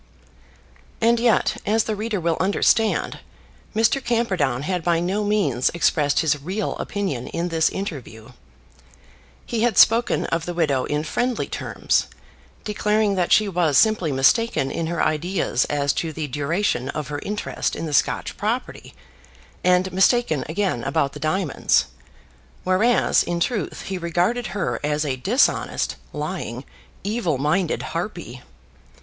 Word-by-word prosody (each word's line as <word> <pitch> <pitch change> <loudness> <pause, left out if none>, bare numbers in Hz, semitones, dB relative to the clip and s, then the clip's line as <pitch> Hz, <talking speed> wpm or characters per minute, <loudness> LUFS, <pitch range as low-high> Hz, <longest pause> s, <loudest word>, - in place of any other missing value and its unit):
And 230 +1 +3
yet, 235 -2 +2
as 220 +1 +2
the 215 - -2
reader 215 -1 -2
will 165 -1 0
understand, 205 +4 +1 0.6
Mr. 230 +5 +2
Camperdown 190 - 0
had 180 0 -2
by 170 -1 +2
no 190 +5 -1
means 180 - +1
expressed 150 -4 +2
his 150 -3 0
real 190 +8 -3
opinion 185 -12 -3
in 170 +1 -3
this 165 -1 +2
interview. 130 - -7 1.2
He 230 -2 -2
had 230 -4 +1
spoken 230 +2 +4
of 165 0 -2
the 175 - -4
widow 145 -6 +1
in 150 +1 -1
friendly 245 +9 -1
terms, - - -1 0.6
declaring 210 0 +1
that 180 -3 0
she 215 - +5
was 170 -6 +1
simply 215 -8 +3
mistaken 135 - +2
in 165 - -2
her 170 +1 -1
ideas 160 -4 0
as 145 -1 0
to 165 - -2
the 155 0 -4
duration 145 0 -1
of 150 0 -4
her 145 -1 -3
interest 210 +5 -3
in - - -4
the 155 - -4
Scotch 135 - +1
property, - - -4 0.7
and 180 +1 +2
mistaken 190 - +2
again 170 - -1
about 140 0 0
the - - -8
diamonds; 155 -1 +1 0.8
whereas 200 +7 +3
in 175 0 -2
truth 210 +4 -2
he 190 -1 -4
regarded 180 +8 0
her 125 - -2
as 150 +1 0
a 135 -3 -1
dishonest, 205 - +1 0.2
lying, - - -5 0.4
evil 200 - -1
minded 155 +5 0
harpy. 170 - -5
175 Hz, 140 wpm, -22 LUFS, 150-210 Hz, 1.2 s, she